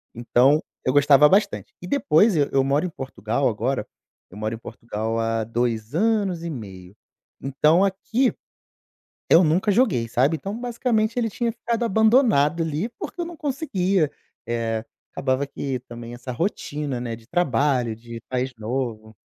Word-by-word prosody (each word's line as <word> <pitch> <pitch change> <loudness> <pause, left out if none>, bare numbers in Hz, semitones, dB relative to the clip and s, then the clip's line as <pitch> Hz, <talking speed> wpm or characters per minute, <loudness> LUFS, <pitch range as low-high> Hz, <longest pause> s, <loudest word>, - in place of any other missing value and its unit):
Então 125 +5 +3 0.2
eu 130 - +3
gostava 145 +1 +6
bastante. 205 +5 +1
E, 180 - -7
depois 205 - +3
eu 145 -2 +2
eu 135 - +3
moro 140 +5 +1
em - - -2
Portugal 130 - -2
agora. 120 +4 -2 0.4
Eu 95 - -11
moro 110 +1 -2
em - - -8
Portugal 115 -1 -4
há 115 0 0
2 115 0 -2
anos 200 -3 +1
e 170 - -3
meio. 95 - -9 0.5
Então, 150 +6 +3
aqui, 225 +6 0 1.0
eu 170 +2 +7
nunca 175 +7 +2
joguei, 185 - +2
sabe. 135 +7 +2
Então, 195 +7 -5
basicamente, 235 -2 0
ele 230 -2 +1
tinha 235 +3 -1
ficado 235 0 -2
abandonado 220 - +3
ali, 160 +6 -2
porque 350 - -6
eu - - 0
não 345 - -9
conseguia. 200 - 0 0.4
Eh, 115 -1 -1 0.3
acabava 130 +1 0
que 135 -2 -4
também 120 -1 -9
essa 125 +1 -7
rotina, 145 - -3
né, 115 -2 -4
de 115 0 -18
trabalho, 135 -7 +1
de 115 +1 -9
país 130 +1 -1
novo 110 -1 -4
140 Hz, 155 wpm, -23 LUFS, 120-195 Hz, 1.0 s, eu